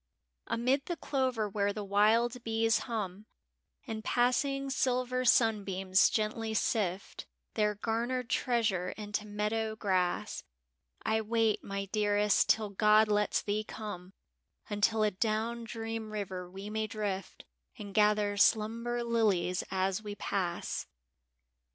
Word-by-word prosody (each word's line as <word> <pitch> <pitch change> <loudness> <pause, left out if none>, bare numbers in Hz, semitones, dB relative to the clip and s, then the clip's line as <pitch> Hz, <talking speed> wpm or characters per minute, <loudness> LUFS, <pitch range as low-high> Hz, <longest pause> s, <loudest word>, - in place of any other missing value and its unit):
Amid 255 +4 0
the 345 - -2
clover 255 -6 0
where 200 0 0
the 210 0 -5
wild 225 +5 +2
bees 225 0 +2
hum 210 -2 -4 0.6
And 220 -3 -5
passing 275 +3 +1
silver 255 -1 0
sunbeams 200 -5 +3
gently 220 +1 -1
sift 200 -3 -1 0.3
Their 210 -1 +1
garnered 235 +4 -2
treasure 220 -8 0
into 210 0 -4
meadow 215 +1 -1
grass, 185 -4 -1 0.6
I 220 0 +2
wait, 225 0 +1
my 200 0 -4
dearest, 205 0 +2
till 215 -2 +2
God 215 +2 +4
lets 210 0 +1
thee 210 +1 -1
come 195 -4 -7 0.3
— - - -33
Until 215 +1 +2
adown 220 +3 -1
Dream 225 -1 -5
River 185 -4 -5
we 195 +2 -8
may 220 0 -1
drift 205 -3 -4 0.3
And 205 -3 -8
gather 210 -1 +3
slumber 230 +3 +2
lilies 205 -6 +1
as 190 +1 0
we 205 -1 -6
pass. 185 -3 -2
215 Hz, 120 wpm, -31 LUFS, 205-230 Hz, 0.6 s, God